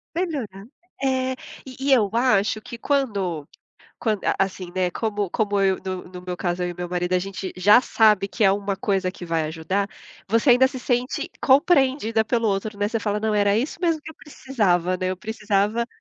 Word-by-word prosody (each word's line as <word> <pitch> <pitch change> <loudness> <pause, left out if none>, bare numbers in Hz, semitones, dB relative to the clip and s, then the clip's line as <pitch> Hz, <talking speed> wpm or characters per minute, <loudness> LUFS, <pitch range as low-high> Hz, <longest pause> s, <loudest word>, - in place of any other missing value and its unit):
Vai 355 +2 +1
melhorar! 220 - -6 0.4
É, 260 -1 +1 0.3
e 260 -1 -10
e - - +7
eu 215 -6 +3
acho 215 -3 +2
que, 235 +2 -9
quando 200 - -1 0.5
quando, 215 -3 -1
a - - +2
assim, 190 -2 -2
né, 185 -1 +1
como 205 -2 -2
como 205 -2 0
eu, 190 -1 +2
no 185 -1 -4
no 180 0 -10
meu 180 0 -5
caso, 175 0 -2
eu 180 - -1
e - - -5
o - - -16
meu 180 0 -4
marido, 180 0 -2
a - - +4
gente 190 0 -5
já 205 +6 +6
sabe 215 -5 +3
que 220 - -3
é 195 - +6
uma 200 0 -2
coisa 195 -2 0
que 175 - -9
vai 165 -2 -1
ajudar, 165 +6 -2 0.4
você 230 +5 +3
ainda 250 +2 +6
se 260 - -7
sente 255 +7 -1
compreendida 265 -5 +3
pelo 230 0 0
outro, 205 +2 -2
né. 205 0 +1
Você 225 +1 -1
fala: 210 -1 -2
“Não, 220 0 0
era 205 0 +3
isso 260 +9 -2
mesmo 335 -3 +1
que - - -8
eu - - -14
precisava, 190 - 0
né. 185 0 -2
Eu 185 - -3
precisava 210 +2 -1
205 Hz, 210 wpm, -23 LUFS, 185-240 Hz, 0.5 s, e